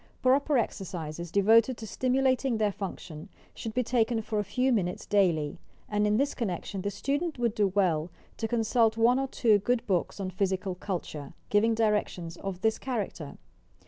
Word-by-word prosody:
Proper 275 +2 +3
exercises, 175 -7 -3
devoted 225 +6 +4
to 225 - -7
stimulating 260 +1 +1
their 210 -1 +1
function, 180 -5 -7 0.2
should 225 -1 -6
be 250 - +2
taken 230 -1 +1
for 215 0 -2
a - - +1
few 250 +6 0
minutes 180 -5 -1
daily; 170 -8 +1 0.3
and 210 0 +1
in 210 0 +2
this 280 +3 +1
connection 195 -3 -3
the 200 - -1
student 290 - -2
would 235 -3 0
do 210 -3 +2
well 180 -4 +1 0.3
to 225 - -2
consult 225 -1 +2
one 240 +3 +4
or 270 - -1
two 220 -5 +3
good 240 +3 0
books 185 0 -1
on 190 -1 -3
physical 190 0 -1
culture, 175 -6 -5
— - - -37
giving 225 +2 +3
directioua 210 -6 0
of 190 -2 -5
this 220 +1 +1
character. 205 - -4
210 Hz, 175 wpm, -28 LUFS, 185-240 Hz, 0.3 s, devoted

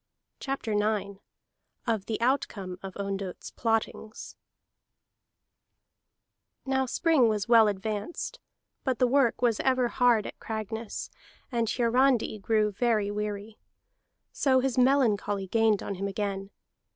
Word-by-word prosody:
CHAPTER 270 -5 -3
IX 205 -2 0 0.7
OF 220 -5 -1
THE 220 - -2
OUTCOME 205 -8 -1
OF 190 -1 -8
ONDOTT'S 195 -2 -4
PLOTTINGS 225 -1 -2 2.3
Now 265 -1 +1
spring 275 -3 +3
was 210 -1 -1
well 230 -2 +7
advanced, 210 - -3 0.4
but 260 -3 0
the 255 - +4
work 250 -1 +2
was 230 -3 +3
ever 255 -2 +2
hard 245 -4 +3
at - - -8
Cragness, 220 0 -5 0.4
and 230 -3 0
Hiarandi 245 -2 +2
grew 215 +1 +1
very 215 -1 +1
weary. 210 +1 -4 0.7
So 260 -2 +3
his 260 -1 0
melancholy 235 -7 +2
gained 220 +1 +2
on - - -3
him 195 +1 -3
again. 195 -1 -3
220 Hz, 115 wpm, -28 LUFS, 205-245 Hz, 2.3 s, well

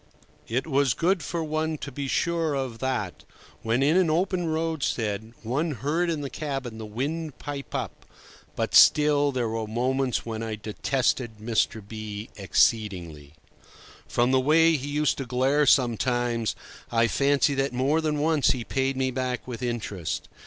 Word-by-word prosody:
It 125 +4 -1
was 140 -5 +2
good 180 +1 +1
for 165 +1 -3
one 155 0 -1
to 140 - -7
be 140 +1 -4
sure 165 +1 0
of 130 -4 -3
that 125 -8 -3 0.4
when, 115 +4 +1
in 150 +4 +3
an 185 -3 +3
open 180 +2 0
roadstead, 135 -10 -2
one 145 +8 -1
heard 155 +7 -1
in 160 -3 -1
the 140 - -4
cabin 135 -7 -4
the 110 - -6
wind 145 +7 -4
pipe 145 -1 -6
up; - - -5 0.5
but - - -2
still, 145 -1 +6
there 125 -3 -1
were 110 0 -3
moments 125 +3 0
when 110 -1 -4
I 110 -1 -3
detested 115 +2 -1
Mr. 110 -1 -1
B— 110 0 -7
exceedingly. 90 -8 0 0.7
From 120 +1 +1
the 130 - +4
way 160 +4 +4
he 140 -1 -3
used 150 0 0
to 135 - -3
glare 135 +4 +2
sometimes, 120 -2 +2 0.4
I 115 0 +3
fancy 140 +2 +2
that 135 0 0
more 135 +6 +1
than 155 -2 0
once 155 -1 +2
he 125 -3 +2
paid 135 +2 -1
me 130 -1 0
back 125 0 -3
with 125 -1 -6
interest. 110 -8 -3
130 Hz, 160 wpm, -26 LUFS, 115-150 Hz, 0.7 s, still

